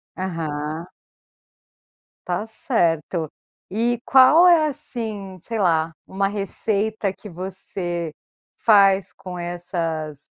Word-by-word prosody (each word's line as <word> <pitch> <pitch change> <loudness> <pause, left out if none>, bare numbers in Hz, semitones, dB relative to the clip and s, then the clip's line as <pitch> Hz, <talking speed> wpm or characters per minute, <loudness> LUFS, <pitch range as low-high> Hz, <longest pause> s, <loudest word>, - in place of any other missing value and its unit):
Aham. 160 -2 -4 1.4
Tá 180 +4 -1
certo. 170 - 0 0.4
E 235 +3 0
qual 270 +7 +7
é, 320 -3 +5
assim, 215 -9 -5
sei 225 +4 -4
lá, 165 -3 +2
uma 195 +1 0
receita 205 +1 -1
que 210 - -11
você 175 -2 -4 0.5
faz 200 -3 +4
com 180 -1 -8
essas 165 -4 -4
190 Hz, 90 wpm, -22 LUFS, 170-215 Hz, 1.4 s, qual